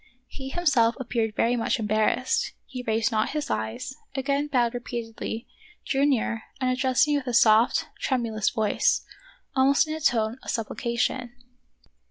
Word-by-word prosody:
He 265 -1 -8
himself 270 -8 +2
appeared 230 -3 -1
very 240 +2 +2
much 230 - 0
embarrassed. 220 - +1
He 255 -2 -7
raised 225 0 0
not 215 +2 0
his 300 - -3
eyes, 110 - -3 0.2
again 280 +2 0
bowed 245 -4 +1
repeatedly, 230 -1 -5 0.4
drew 275 +1 +2
nearer, 230 -4 0 0.2
and 255 -1 +1
addressed 260 +2 +2
me 295 -1 +2
with 275 -2 -5
a 245 - 0
soft, 225 +1 +5 0.2
tremu 240 -4 0
lous 215 -1 +1
voice, 215 -2 +1 0.5
almost 275 +3 +4
in 310 - -3
a 315 - -4
tone 230 -2 +1
of - - -9
supplication. 235 +2 -2
245 Hz, 155 wpm, -26 LUFS, 225-265 Hz, 0.5 s, soft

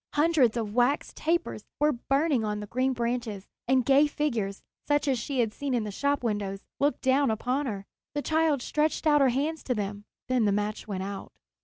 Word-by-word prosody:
Hundreds 295 -7 +3
of 215 -3 -3
wax 250 +5 +1
tapers 335 +2 -1 0.2
were 300 +1 +4
burning 275 0 +1
on 210 -1 -2
the 210 - -5
green 255 +5 0
branches, 235 -4 -2 0.2
and 260 -1 +3
gay 280 +2 +5
figures, 235 -10 -2 0.2
such 290 0 +2
as 260 -3 +2
she 260 +2 -1
had 220 -2 -1
seen 275 0 -2
in 235 - 0
the 210 - -4
shop 280 +6 0
windows, 205 -3 -2 0.2
looked 285 +1 +1
down 270 +1 +3
upon 255 +6 -1
her. 200 -4 -4 0.3
The 290 - -1
child 315 -4 +2
stretched 305 +2 0
out 295 -2 +5
her 270 - +5
hands 290 +6 -1
to 250 - 0
them; 205 0 -4 0.2
then 255 -3 +2
the 205 - +3
match 210 +2 -2
went 190 -3 -3
out. 195 0 -6
250 Hz, 200 wpm, -28 LUFS, 215-290 Hz, 0.3 s, gay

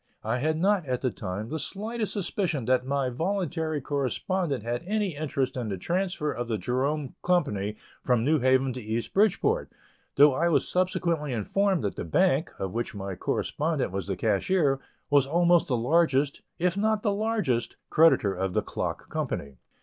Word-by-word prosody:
I 125 - -1
had 155 +4 0
not, 195 +2 +2
at 125 -1 -1
the 130 - 0
time, 100 +2 -5
the 160 - -3
slightest 215 +5 -3
suspicion 175 - -1
that 130 +1 +2
my 135 -2 0
voluntary 165 0 -1
correspondent 140 - -1
had 120 +1 -2
any 205 -5 0
interest 140 -3 -2
in 120 -4 -3
the 95 - -3
transfer 175 - -1
of 120 -3 -4
the 115 -2 -1
Jerome 135 +4 -1
Company 105 - 0 0.3
from 125 -3 +2
New 155 +4 +3
Haven 130 0 +3
to 125 - -6
East 110 +2 -3
Bridgeport, 220 - +2 0.4
though 145 0 +7
I 170 +6 +2
was 165 - +2
subsequently 170 -5 0
informed 190 - +1
that 100 - -2
the - - -3
bank, 80 - +2
of 95 -1 -3
which 120 -1 -3
my 95 -1 -4
correspondent 150 - -1
was 95 -2 -3
the 95 -2 -2
cashier, 135 - +2 0.3
was 140 -2 +5
almost 175 +2 +3
the 125 - +1
largest, 140 +2 +2 0.2
if 180 +1 +1
not 215 +1 +1
the 205 -3 +2
largest, 200 - -1
creditor 155 -11 +5
of 95 0 -3
the - - +2
clock - - -4
company. 70 -2 -4
145 Hz, 175 wpm, -27 LUFS, 120-180 Hz, 0.4 s, though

